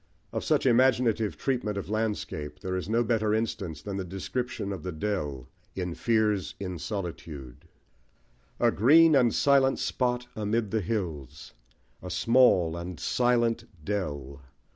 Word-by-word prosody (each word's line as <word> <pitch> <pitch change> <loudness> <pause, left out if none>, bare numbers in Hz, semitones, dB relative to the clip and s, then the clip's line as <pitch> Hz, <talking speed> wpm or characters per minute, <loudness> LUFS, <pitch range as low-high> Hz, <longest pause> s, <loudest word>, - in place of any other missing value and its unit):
Of - - -2
such - - +1
imaginative 120 -3 +3
treatment 120 -6 -1
of 100 - -4
landscape 105 -9 -3
there 95 0 -3
is 95 +2 -4
no 115 +2 +2
better 110 -2 +1
instance 100 -8 -3
than 100 -1 -4
the 95 - -2
description 100 +3 -4
of 95 - -6
The 90 - -4
Dell, 75 -8 -3 0.3
in 90 -2 -3
Fears 110 -2 0
in 90 -3 -5
Solitude 80 - -6 0.9
A - - +4
green 155 - +6
and 125 -4 +4
silent 135 0 +3
spot 125 -1 -1
amid 110 0 -1
the 110 - +1
hills, 85 - -4 0.5
A - - -7
small 115 -9 +4
and 85 0 -6
silent 120 -2 +1 0.2
dell! 70 -9 -4
105 Hz, 140 wpm, -28 LUFS, 85-120 Hz, 0.9 s, green